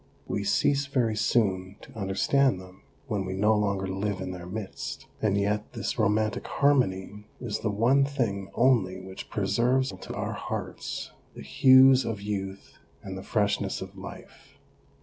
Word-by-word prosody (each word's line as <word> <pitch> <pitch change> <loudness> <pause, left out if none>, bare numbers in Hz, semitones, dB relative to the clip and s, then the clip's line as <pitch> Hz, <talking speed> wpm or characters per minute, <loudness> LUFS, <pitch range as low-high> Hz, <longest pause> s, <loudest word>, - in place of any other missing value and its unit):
We 100 - -2
cease 140 +7 +2
very 125 -6 +1
soon 95 -4 +1
to - - -14
understand 110 +4 +2
them 95 0 -14 0.2
when 105 -7 -2
we 95 0 -4
no 105 +3 +3
longer 100 -2 0
live 95 +1 -2
in 95 0 -4
their 90 -1 -8
midst, 100 +1 -6 0.2
and 100 -2 +2
yet 105 +1 -1
this 115 +1 -3
romantic 110 0 +1
harmony 105 -7 +1
is - - -3
the 110 - -1
one 120 +7 +3
thing 115 -9 -2
only 115 -8 +3
which 95 0 -9
preserves 130 +2 +1
to - - -8
our - - -3
hearts - - -5 0.2
the - - -9
hues 130 - +6
of 115 -3 -3
youth 100 -1 -5 0.2
and 95 -1 -6
the 95 - -6
freshness 100 -1 0
of 95 +1 -8
life. 95 0 -11
105 Hz, 155 wpm, -27 LUFS, 95-120 Hz, 0.2 s, hues